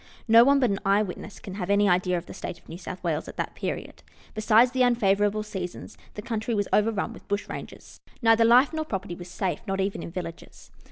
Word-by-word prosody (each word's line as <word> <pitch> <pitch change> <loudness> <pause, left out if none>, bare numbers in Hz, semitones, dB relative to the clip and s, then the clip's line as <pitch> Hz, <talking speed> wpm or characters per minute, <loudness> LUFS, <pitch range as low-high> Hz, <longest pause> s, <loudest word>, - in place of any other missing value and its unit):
No 230 +1 +8
one 280 +2 +4
but 250 -5 +2
an 195 - -1
eye 200 +1 +3
witness 195 +1 -8
can 190 - -8
have 190 -1 -5
any 200 0 +4
idea 180 -1 +2
of 170 - -6
the - - -10
state 170 - -6
of - - -24
New 170 - -8
South 185 0 -8
Wales 160 -3 -1
at - - -10
that - - -3
period. - - -5 0.3
Besides 220 +3 +4
the 260 0 0
unfavourable 210 -3 +2
seasons, 190 -1 -7 0.2
the 210 - -6
country 225 0 -2
was 205 -1 0
overrun 210 -1 +1
with - - -15
bushrangers. 205 0 -6 0.2
Neither 225 -1 +4
life 245 +6 +5
nor 315 0 -1
property 195 - -4
was 175 0 -9
safe, 180 +1 -2
not 195 0 -2
even 195 +1 -1
in - - -6
vil 180 +1 -4
lages. 165 0 -11
205 Hz, 225 wpm, -26 LUFS, 185-225 Hz, 0.3 s, No